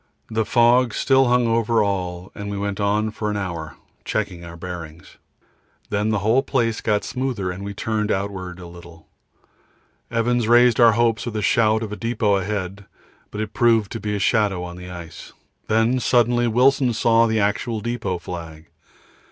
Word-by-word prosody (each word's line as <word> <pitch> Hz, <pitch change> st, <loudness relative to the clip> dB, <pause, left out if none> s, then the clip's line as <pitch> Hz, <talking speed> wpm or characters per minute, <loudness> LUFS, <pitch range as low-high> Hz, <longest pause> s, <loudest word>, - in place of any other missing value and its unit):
The 110 Hz, 0 st, 0 dB
fog 120 Hz, 0 st, +3 dB
still 135 Hz, -1 st, +3 dB
hung 125 Hz, 0 st, +3 dB
over 115 Hz, -1 st, +2 dB
all 90 Hz, -2 st, -3 dB
and 100 Hz, 0 st, -6 dB
we 100 Hz, -, -4 dB
went 100 Hz, 0 st, -3 dB
on 105 Hz, +2 st, +1 dB
for 105 Hz, 0 st, -3 dB
an 105 Hz, -, -2 dB
hour, 85 Hz, -5 st, -5 dB, 0.3 s
checking 100 Hz, -5 st, -3 dB
our 85 Hz, 0 st, -10 dB
bearings. 85 Hz, -2 st, -9 dB, 0.7 s
Then 105 Hz, +1 st, 0 dB
the 110 Hz, -, +1 dB
whole 115 Hz, +5 st, +4 dB
place 115 Hz, -5 st, -1 dB
got 105 Hz, -2 st, 0 dB
smoother 125 Hz, -8 st, -3 dB
and 95 Hz, +2 st, -7 dB
we 100 Hz, 0 st, -6 dB
turned 105 Hz, 0 st, -1 dB
outward 95 Hz, -2 st, -3 dB
a 90 Hz, -, -10 dB
little. 85 Hz, -1 st, -13 dB, 1.0 s
Evans 120 Hz, 0 st, 0 dB
raised 120 Hz, 0 st, +5 dB
our 115 Hz, -2 st, +7 dB
hopes 115 Hz, 0 st, +1 dB
with 115 Hz, -, -5 dB
a 105 Hz, -, -2 dB
shout 110 Hz, -1 st, +2 dB
of 105 Hz, -2 st, -6 dB
depot 110 Hz, -2 st, +1 dB
ahead, 100 Hz, 0 st, -4 dB, 0.4 s
but 105 Hz, -, -5 dB
it 110 Hz, -1 st, -5 dB
proved 115 Hz, -4 st, +2 dB
to 115 Hz, -, -4 dB
be 105 Hz, 0 st, -3 dB
a -, -, -2 dB
shadow 100 Hz, -3 st, +1 dB
on 85 Hz, -1 st, -7 dB
the 90 Hz, 0 st, -9 dB
ice. 85 Hz, -2 st, -10 dB, 0.3 s
Then 115 Hz, +4 st, +2 dB
suddenly 120 Hz, -1 st, +2 dB
Wilson 125 Hz, +2 st, +3 dB
saw 115 Hz, +1 st, +3 dB
the 110 Hz, 0 st, 0 dB
actual 110 Hz, +3 st, -1 dB
depot 110 Hz, -5 st, -3 dB
flag. 85 Hz, -2 st, -9 dB
105 Hz, 175 wpm, -22 LUFS, 95-115 Hz, 1.0 s, our